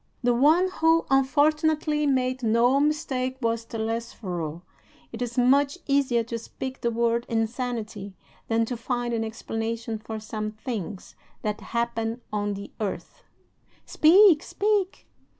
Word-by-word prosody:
The 245 0 +3
one 310 +9 +4
who 325 +1 +4
unfortunately 300 +2 +2
made 255 -1 +1
no 235 +4 +3
mistake 270 -4 0
was 230 -2 -1
Telesforo. 220 -8 -4 0.5
It - - -8
is 240 0 -3
much 275 +5 +3
easier 275 -4 +2
to 230 0 -5
speak 260 +3 -7
the 235 - +1
word 235 +1 0
'insanity' 225 -3 -3 0.3
than 225 0 +2
to 245 - -4
find 240 0 -2
an 225 -1 0
explanation 225 0 -4
for 220 +1 -6
some 215 0 -4
things 215 -4 -6 0.3
that 210 -1 -2
happen 235 0 -2
on 205 -1 -1
the 200 +1 -8
earth." 210 -3 -5 0.6
"Speak, 345 0 +6
speak!" 405 -2 -1
235 Hz, 130 wpm, -26 LUFS, 225-275 Hz, 0.6 s, Speak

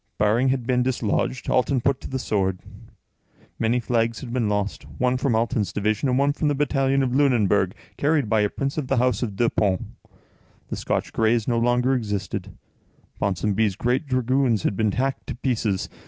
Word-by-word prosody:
Baring 110 +5 +2
had 130 -2 -1
been 125 0 +2
dislodged, 125 0 -1
Alten 130 +1 +2
put 135 +2 0
to - - -7
the 130 - -2
sword. 95 -7 0 1.0
Many 115 +2 +2
flags 115 -1 0
had 120 - -7
been 120 -4 0
lost, 105 0 -1 0.2
one 125 0 +1
from 130 -2 +1
Alten's 110 -4 0
division, 105 +5 0
and 125 - +2
one 140 +1 +2
from 150 - -1
the 145 - +1
battalion 135 -1 +1
of 125 -2 -1
Lunenburg, 105 -8 +2 0.2
carried 145 -4 +1
by 110 0 +2
a 105 - +2
prince 135 +6 -3
of 140 - -4
the 135 - +1
house 125 -3 +2
of 110 -5 -3
Deux 115 +3 +2
Ponts. 95 -4 0 0.9
The - - -3
Scotch - - -2
Grays 115 0 +2
no 120 -2 +1
longer 125 +2 +2
existed; 105 -6 -3 0.6
Ponsonby's 100 +1 0
great 125 - 0
dragoons 130 -3 +1
had - - 0
been 110 0 +1
hacked 135 +2 -2
to - - -4
pieces. 115 -6 -1
120 Hz, 185 wpm, -24 LUFS, 105-130 Hz, 1.0 s, Baring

